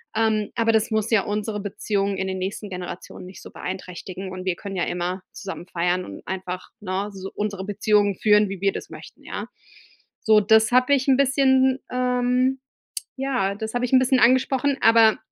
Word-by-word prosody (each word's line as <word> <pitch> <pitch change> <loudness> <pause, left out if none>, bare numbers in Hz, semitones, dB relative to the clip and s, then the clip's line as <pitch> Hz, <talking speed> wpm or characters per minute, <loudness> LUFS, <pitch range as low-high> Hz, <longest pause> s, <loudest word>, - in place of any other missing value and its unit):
ähm, 220 -1 +1
aber 230 -1 +2
das 220 +1 +1
muss 220 -1 0
ja 220 -3 +4
unsere 210 0 -3
Beziehung 200 0 -2
in 190 - -2
den 190 0 -3
nächsten 200 +2 -4
Generationen 180 -1 -7
nicht 185 +1 -11
so - - -11
beeinträchtigen, 185 0 -7
und 185 0 -7
wir 185 -2 0
können 195 +2 -7
ja 180 - 0
immer 180 +1 -3
zusammen 195 -3 -7
feiern 180 +1 -1
und 100 - -9
einfach, 185 -1 -5
ne, 195 +1 -3
so 195 0 -7
unsere 200 -2 -3
Beziehungen 205 0 +2
führen, 210 +1 +4
wie 195 -1 -6
wir 195 0 +3
das - - -7
möchten, - - -12
ja?“ - - -6 0.7
So, 220 -1 +5
das 220 +2 +4
habe 255 +3 +4
ich 270 -1 +1
'n 265 -2 +5
bisschen, 265 -1 +3
ähm 250 +1 +1 0.6
ja, 260 -8 -1
das 220 +1 -5
habe 245 0 0
ich - - -10
'n 260 - +7
bisschen 255 0 +3
angesprochen, 260 +3 +3
aber 225 -1 +6
210 Hz, 190 wpm, -23 LUFS, 190-250 Hz, 0.7 s, n